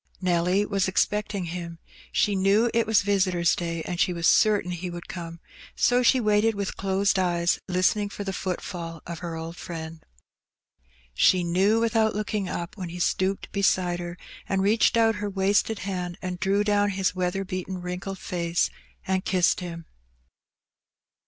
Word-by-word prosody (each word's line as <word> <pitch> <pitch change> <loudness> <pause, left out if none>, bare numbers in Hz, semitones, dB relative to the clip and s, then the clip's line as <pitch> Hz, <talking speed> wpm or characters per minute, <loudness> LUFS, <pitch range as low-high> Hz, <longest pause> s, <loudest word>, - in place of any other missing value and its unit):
Nelly 180 +2 +2
was 200 -2 0
expecting 210 +1 0
him; 170 0 -6 0.3
she 205 - +2
knew 200 +5 +3
it 230 -1 +2
was 220 -2 +4
visitors^ 185 -4 +2
day, 165 -2 -3
and 175 -1 -4
she 180 - +2
was 170 -1 -3
certain 205 -4 +4
he 180 +1 -4
would 175 0 -8
come, 170 -1 -7 0.4
so 245 0 +3
she 255 +1 +4
waited 215 0 +2
with 200 -1 -3
closed 195 0 +1
eyes, 175 -2 +1
listening 190 +3 +1
for 205 - -6
the 195 -1 -3
footfall 175 -3 -5
of 170 -1 -6
her 170 -2 -5
old 165 +1 -6
friend. 160 -1 -7 1.1
She 180 - +4
knew 190 +6 +2
without 225 -1 +2
looking 210 -2 -2
up 170 0 -5
when 185 -3 -5
he 175 - -7
stooped 190 +2 0
beside 185 -3 +1
her, 175 0 -6 0.3
and 190 -1 +1
reached 220 +3 +3
out 225 -1 +3
her 205 - -2
wasted 200 +3 +1
hand, 180 -3 -3
and 180 -1 -5
drew 200 +2 +2
down 205 0 +2
his 190 -1 0
weather 185 +1 -1
beaten 185 0 -4
wrinkled 180 +2 -5
face 170 -2 -1 0.3
and 190 0 0
kissed 180 -2 +2
him. 170 -2 -7
185 Hz, 165 wpm, -26 LUFS, 175-205 Hz, 1.1 s, was